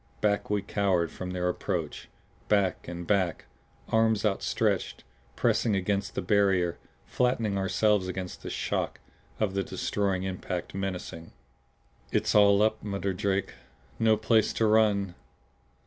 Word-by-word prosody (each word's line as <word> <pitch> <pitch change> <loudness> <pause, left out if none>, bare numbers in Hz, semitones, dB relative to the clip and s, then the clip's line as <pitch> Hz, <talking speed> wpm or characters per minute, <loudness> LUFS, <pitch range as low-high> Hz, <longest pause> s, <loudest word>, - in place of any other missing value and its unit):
Back 100 -1 0
we 105 -1 0
cowered 95 -5 +1
from 90 - -6
their 90 -1 -1
approach 90 -3 -3 0.4
back 100 -4 +1
and 85 0 -6
back; 95 -3 0 0.4
arms 110 -1 +2
outstretched, 100 -2 0 0.3
pressing 110 -3 +2
against 100 +1 -1
the - - -2
barrier, 95 -4 +2 0.3
flattening 115 -5 0
ourselves 95 +1 +2
against 90 0 -5
the - - -6
shock - - -2 0.4
of 105 -3 0
the 100 - 0
destroying 95 0 -1
impact 90 -2 -4
menacing. 90 -4 -5 0.8
"It's - - +1
all 100 0 +6
up," 110 0 +1
muttered 100 -2 -2
Drake. 95 -1 -1 0.5
"No 110 -1 +4
place 110 0 +2
to 115 - +1
run. 105 -3 +3
100 Hz, 130 wpm, -28 LUFS, 90-105 Hz, 0.8 s, all